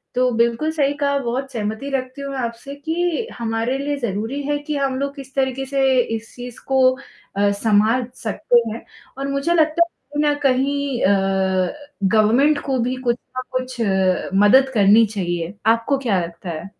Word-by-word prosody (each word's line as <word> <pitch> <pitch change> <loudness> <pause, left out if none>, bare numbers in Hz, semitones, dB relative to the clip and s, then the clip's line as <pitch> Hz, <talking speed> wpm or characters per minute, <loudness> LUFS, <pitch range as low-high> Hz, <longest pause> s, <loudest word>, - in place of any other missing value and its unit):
तो 250 0 +3
बिल्कुल 235 +7 +1
सही 285 -3 +1
कहा, 280 -1 +1
बहुत 265 +2 -3
सहमति 220 +4 -4
रखती 255 +1 -4
हूँ 275 0 -5
मैं 270 - -5
आपसे 235 +4 -5
कि 335 +8 -2
हमारे 230 +3 -1
लिए 285 +1 -2
ज़रूरी 230 +5 -3
है 290 +1 0
कि 300 - -1
हम 270 -2 0
लोग 280 0 -3
इस 270 0 -11
तरीके 270 0 0
से 275 0 -1 0.3
इस 225 0 -8
चीज़ 245 -1 -9
को 265 -1 +2 0.6
अ, 200 0 +3
सँभाल 220 +4 +2 0.2
सकते 235 +2 +2
हैं 225 - -7 0.3
और 275 0 -3
मुझे 275 +5 0
लगता 320 +1 +3
है 340 - -20 0.2
कहीं 295 0 +2
न - - 0
कहीं 275 0 +1
अ, 190 -1 +2 0.3
गवर्नमेंट 225 +9 +3
को 265 -2 0
भी 250 +2 0
कुछ 235 - +3 0.2
ना - - 0
कुछ 255 -1 -4
अ, 190 -3 +1 0.2
मदद 265 +5 +6
करनी 215 +1 +6
चाहिए, 175 -4 -3
आपको 230 +5 +2
क्या 225 -9 0
लगता 170 +1 -7
है? 160 +2 -5
255 Hz, 180 wpm, -20 LUFS, 215-280 Hz, 0.6 s, मदद